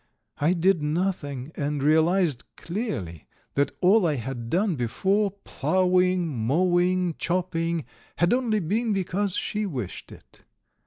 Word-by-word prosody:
I 155 +5 +3
did 180 -1 +2
nothing, 150 -4 -2
and 145 -1 -2
realized 160 -1 +3
clearly 170 - -4 0.3
that 140 0 +1
all 190 +1 +5
I 150 - +1
had 120 -1 -5
done 185 - +1
before, 190 - +1
ploughing, 185 -1 +2
mowing, 175 +7 +1
chopping, 170 -3 -1 0.3
had 175 +4 +2
only 235 -4 +1
been 215 +6 0
because 195 0 -1
she 210 0 -2
wished 125 - -6
it. - - -16
175 Hz, 120 wpm, -25 LUFS, 145-190 Hz, 0.3 s, all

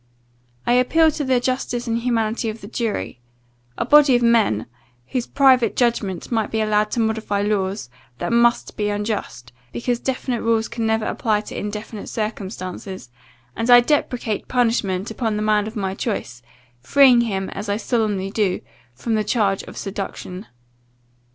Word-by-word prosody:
I 240 - +3
appeal 315 +6 +4
to 295 - -3
the 260 -2 +2
justice 245 -1 -2
and 230 -1 0
humanity 230 -1 0
of 220 +1 -7
the 200 - -9
jury 225 - -3 0.6
a - - -1
body 290 -1 +6
of 240 - +2
men, 225 - +3 0.4
whose 250 -2 -2
private 255 -5 +4
judgment 230 -7 0
must 225 -3 0
be 220 - 0
allowed 215 -1 +2
to - - -1
modify 220 -2 0
laws, 200 - -1 0.3
that 235 - -2
must 235 0 +2
be 210 -1 -1
unjust, 205 - -4 0.2
because 240 0 -2
definite 255 -2 -2
rules 225 -1 +1
can 230 -1 -3
never 220 0 +1
apply 215 -3 0
to - - -9
indefinite 210 +1 -5
circumstances 190 - -5 0.4
and 230 +2 -2
I 245 0 +10
deprecate 245 -5 -1
punishment 225 -5 0
upon 220 -1 -1
the 210 - -1
man 210 -1 +2
of 220 - -8
my 195 -3 -2
choice, 190 - -4 0.4
freeing 255 - +5
him, 195 -5 -2
as 205 +1 -6
I 200 - +1
solemnly 210 -4 -1
do, 200 -4 0 0.3
from 225 - -3
the 215 -1 +2
charge 205 -2 +1
of - - -11
seduction. 195 -1 -6
220 Hz, 160 wpm, -21 LUFS, 205-240 Hz, 0.6 s, I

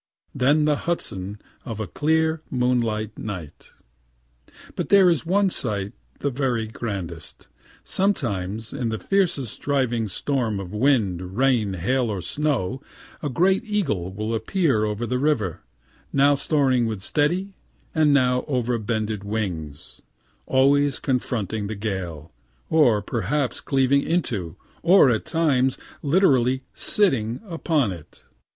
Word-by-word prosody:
Then 145 +3 +3
the 150 -1 +2
Hudson 100 - -3 0.2
of 110 -3 -6
a 110 - -2
clear 160 - +1
moonlight 120 -4 0
night. 90 -8 -7 1.1
But - - -3
there 195 -3 +6
is 165 -1 -1
one 195 +1 +3
sight 100 - -2 0.3
the 140 - 0
very 125 -4 0
grandest. 95 -8 -6 0.4
Sometimes 110 - -1
in 130 -4 -2
the 110 - -2
fiercest 140 - 0
driving 125 -6 0
storm 115 0 -1
of 95 -1 -7
wind, 105 -7 +1
rain, 125 -7 +2
hail 125 +7 0
or 100 -3 -2
snow, 130 - -1 0.4
a 145 - -2
great 185 - +2
eagle 160 - -1
will 105 +4 -3
appear 130 - +1
over 105 +2 -2
the 125 +2 -1
river, 125 - 0 0.5
now 140 +1 +4
soaring 135 -4 +2
with 105 -4 -4
steady 175 - 0 0.4
and 155 -2 +4
now 125 -2 +3
overbended 115 -5 -1
wings 90 -9 -5 0.5
always 140 +1 +3
confronting 110 -5 -2
the 110 - -4
gale, 90 -7 -5 0.4
or 125 -10 +4
perhaps 125 +6 -1
cleaving 135 0 +2
into, 115 - -2 0.3
or 170 -6 +6
at 110 - -1
times 135 -6 +2 0.2
literally 135 -6 +3
sitting 125 - +1
upon 160 - 0
it. 85 -5 -11
125 Hz, 125 wpm, -23 LUFS, 105-145 Hz, 1.1 s, there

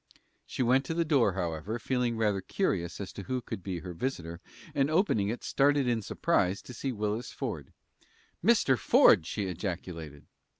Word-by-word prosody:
She - - -2
went 130 +3 +3
to 165 - -3
the 170 0 +1
door, 135 - +3
however, 90 +4 -3
feeling 125 -2 -1
rather 105 -3 +1
curious 90 - -1
as 100 - -6
to - - -7
who 130 +6 -1
could 110 - -6
be 90 -2 -4
her 90 -2 -7
visitor, 85 -6 -4 0.3
and 140 0 +2
on 155 - +2
opening 110 - +2
it 120 - -4
started 140 -1 +2
in 120 -2 +1
surprise 95 -1 0
to 125 - -10
see 135 +3 -3
Willis 105 +1 -3
Ford. - - -5 0.7
"Mr. 205 - +4
Ford!" 80 - +5
she 100 +1 -2
ejaculated. 85 -5 -5
110 Hz, 175 wpm, -30 LUFS, 90-130 Hz, 0.7 s, Ford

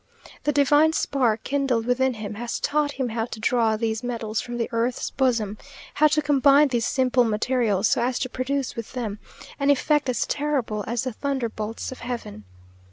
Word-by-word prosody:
The 295 - +3
divine 290 +2 +4
spark 240 -8 +1
kindled 270 -5 0
within 255 +1 +1
him, 215 -1 -6
has 235 +3 -4
taught 295 -1 0
him 260 -3 -2
how 225 0 -2
to 230 - -8
draw 225 -1 +2
these 220 0 -1
metals 230 -3 -3
from 240 0 -6
the 230 - -1
earth's 235 +2 -1
bosom; 230 -6 0 0.3
how 305 - +5
to 305 0 +1
combine 285 0 +5
these 240 -3 0
simple 255 -2 +2
materials, 220 -2 +1
so - - +2
as 250 +1 0
to 255 - -1
produce 255 +1 -2
with 230 -2 -7
them 220 -5 -4 0.4
an 280 0 +1
effect 285 0 +2
as 250 - 0
terrible 270 -8 -1
as 235 0 -1
the 255 -2 -3
thunderbolts 230 -5 -3
of 260 - -9
heaven. 230 - -6
245 Hz, 180 wpm, -24 LUFS, 225-275 Hz, 0.4 s, how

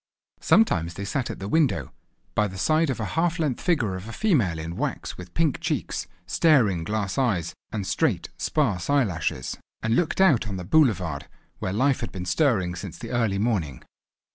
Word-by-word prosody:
Sometimes 85 - +3
they 100 - -5
sat 130 +5 -2
at - - -5
the 100 - -6
window, 155 +2 +1 0.4
by 105 - +2
the 95 -1 -8
side 155 - +2
of 130 - -2
a 110 - -1
half 170 +2 +1
length 150 -7 -1
figure 145 - +1
of 95 +3 -7
a - - -6
female 120 - +1
in 80 +2 -5
wax - - -3
with 90 -1 -11
pink 160 -4 +2
cheeks, - - -2 0.2
staring 115 - +3
glass 105 +3 -2
eyes, 90 - 0 0.2
and 105 -3 -3
straight - - 0
sparse 110 - 0
eyelashes, 95 - 0 0.3
and 110 +1 +2
looked 175 +4 0
out 150 - +4
on 100 -2 -4
the 90 - -5
boulevard, 90 - +2 0.3
where 95 - -2
life 130 +7 +2
had 120 - -4
been 90 -2 -5
stirring 95 - +2
since 85 - -7
the - - -7
early 115 -5 +1
morning. 95 - -1
110 Hz, 185 wpm, -25 LUFS, 90-145 Hz, 0.4 s, out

